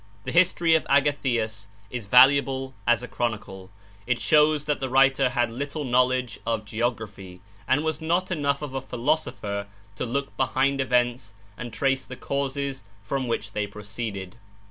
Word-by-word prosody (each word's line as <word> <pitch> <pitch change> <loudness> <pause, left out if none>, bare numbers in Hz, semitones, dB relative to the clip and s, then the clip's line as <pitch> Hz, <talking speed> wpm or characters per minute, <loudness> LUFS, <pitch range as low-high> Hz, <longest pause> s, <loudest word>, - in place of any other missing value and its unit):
The - - -4
history 170 -1 +4
of 160 - +4
Agathias 120 -7 +1 0.2
is 120 -5 -5
valuable 130 +2 +5
as 120 0 +3
a - - -5
chronicle. 105 -6 -4 0.4
It 125 -1 +1
shows 150 -1 +4
that 150 -2 0
the 130 - -3
writer 135 0 +4
had 120 -2 0
little 140 +5 -4
knowledge 125 -2 +1
of 115 -2 -2
geography, 105 -5 -4 0.3
and 145 +4 +2
was 160 0 -2
not 175 +4 0
enough 145 -4 0
of 145 -3 -6
a 135 - -2
philosopher 120 -7 -2 0.3
to - - -2
look 140 +4 -3
behind 135 +1 +1
events 120 -4 0 0.2
and 120 +3 -7
trace 135 +4 0
the 130 - -8
causes 140 -1 -3 0.2
from 130 +5 -2
which 115 -3 -2
they 105 0 -2
proceeded. 100 -1 -6
130 Hz, 155 wpm, -25 LUFS, 115-140 Hz, 0.4 s, valuable